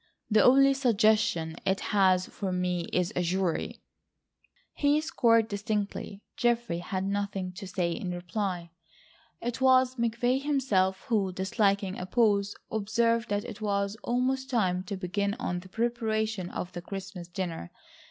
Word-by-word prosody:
—the 215 - +5
only 275 +2 +6
suggestion 215 - +2
it 190 0 +1
has 185 -2 +4
for 195 -2 -4
me 180 -1 -1
is 180 -1 0
a 180 - +1
jury?" 180 -1 -1 0.9
He 290 +1 +2
scored 230 -7 +3
distinctly. 205 -1 -3
Geoffrey 235 -7 +1
had 185 +2 -3
nothing 200 -1 -2
to 195 +1 -8
say 180 -2 -1
in 180 +2 -4
reply. 175 -1 -3 0.7
It 240 +2 -3
was 260 0 +4
McVay 240 +3 +1
himself, 210 -10 +1
who, 210 -7 0
disliking 195 +1 0
a 180 - -5
pause, 205 -2 +2 0.2
observed 230 +2 +1
that 205 0 -1
it 210 - -8
was 200 -1 0
almost 260 +2 0
time 185 -8 +1
to 195 +1 -4
begin 200 +2 -1
on 205 -8 -3
the 185 +1 -13
preparation 220 -3 -1
of 180 - -5
the 175 - -5
Christmas 190 -1 -7
dinner. 175 - -4
200 Hz, 140 wpm, -28 LUFS, 185-230 Hz, 0.9 s, only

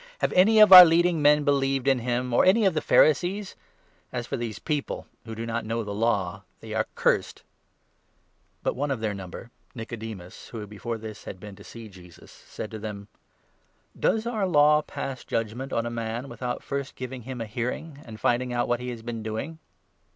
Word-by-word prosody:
" - - -26
Have - - +1
any 210 +5 +5
of 210 -3 +9
our 180 -1 +15
leading 170 -1 +3
men 150 0 +5
believed 135 -2 +1
in 135 -2 +3
him, 125 +1 -2
or - - +2
48 - - +6
any 215 +2 +3
of 190 - +3
the 155 - -1
Pharisees? 180 +7 +2 0.6
As 120 -1 -4
for - - -4
these 115 -3 -4
people 150 -3 -3 0.2
who 115 -1 -7
do 115 +1 -5
not 115 0 -3
know 115 +1 -3
49 - - -10
the 100 - -5
Law— 100 -4 -1 0.2
they 110 -1 -8
are 110 - 0
cursed! - - 0 0.6
" - - -42
But - - -1
one 145 +3 -2
of 135 -4 -1
their 110 -2 -2
number, 95 +4 -9 0.2
Nicodemus, 110 -5 -8
who 110 -3 -7
before 110 +3 -5
this 110 -1 -9
had - - -6
50 - - -22
been 105 0 -10
to - - -14
see 115 -1 -10
Jesus, 90 -4 -15
said 105 - -9
to 110 - -6
them: 105 -1 -7 0.9
"Does 220 0 0
our 220 -5 -1
Law 150 -2 +5
pass 135 -3 -6
judgement 115 +4 -3
on 115 - -1
a 120 - -3
man 115 +3 -4
without 125 -1 -5
first 140 -1 -4
giving 130 0 -6
51 130 +3 -8
him 125 - -7
a - - -3
hearing, 125 +7 -5
and 110 -2 -11
finding 125 +2 +1
out 120 0 0
what 120 0 0
he 125 0 -5
has 120 -2 -7
been 115 -1 -5
doing 110 +9 -5
120 Hz, 215 wpm, -26 LUFS, 110-145 Hz, 0.9 s, our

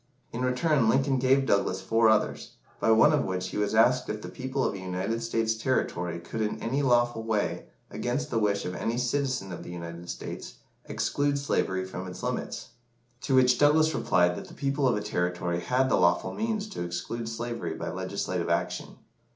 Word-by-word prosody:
In 115 - -3
return, 125 0 +2
Lincoln 135 +2 +2
gave 135 +1 +3
Douglas 100 -4 +1
four 115 +3 +3
others, 110 -1 +1 0.3
by - - +1
one 110 +7 +6
of 150 - +2
which 95 -1 -3
he - - -5
was 105 +1 0
asked 125 +3 +4
if 105 0 -4
the - - -6
people 130 +1 -3
of - - 0
a 100 - -6
United 95 +5 -2
States 115 -1 0
territory 90 -8 -1
could 100 +6 -5
in 105 -1 -1
any 130 +5 -1
lawful 120 -3 +2
way, 110 -2 -1 0.2
against 140 +5 -2
the 115 - +1
wish 100 -2 +1
of 90 - -3
any 115 +5 -2
citizen 125 -5 -1
of 90 - -6
the - - -9
United 85 0 -7
States, - - -6 0.3
exclude 145 0 0
slavery 95 -9 0
from 95 0 -6
its 90 - -8
limits? - - -3 0.5
To 135 - +1
which 125 -1 +5
Douglas 155 +2 +5
replied 90 -1 +2
that - - -7
the - - -13
people 140 0 0
of 120 - +2
a - - -2
territory 90 -3 -1
had 125 +9 +1
the - - +3
lawful 85 - +2
means 220 -1 -2
to 205 - -6
exclude 110 +7 -4
slavery 115 +1 -4
by - - -4
legislative - - -3
action. - - -2
115 Hz, 190 wpm, -28 LUFS, 95-130 Hz, 0.5 s, one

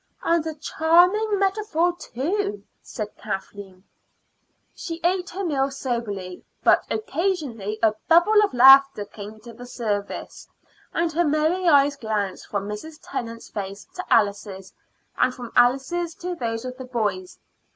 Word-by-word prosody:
"And 335 -1 +2
a 315 - -4
charming 355 +8 +3
metaphor, 385 -3 +1
too," 395 - -3 0.2
said 210 -3 -7
Kathleen. 195 -2 -7 0.9
She 330 -2 -6
ate 365 +2 +1
her 385 +2 -4
meal 275 -4 0
soberly, 230 -9 -4 0.2
but - - +5
occasionally 295 - -2
a 220 -1 +5
bubble 420 +6 +5
of 415 - 0
laughter 270 -3 +7
came 210 +1 -10
to 235 +1 -11
the 245 +2 -11
surface, 210 -5 -4 0.4
and 335 -1 0
her 345 +3 +2
merry 315 +4 +1
eyes 285 -1 +4
glanced 210 -4 -3
from 200 -1 -3
Mrs. 300 +10 -7
Tennant's 230 -1 -6
face 200 -1 -6
to 365 - -5
Alice's, 200 -3 0 0.5
and 255 - +2
from 245 -3 -8
Alice's 275 +8 +2
to 360 +1 -5
those 230 -6 -4
of 255 0 -6
the 260 - -7
boys. 255 - -3
270 Hz, 140 wpm, -23 LUFS, 215-345 Hz, 0.9 s, laughter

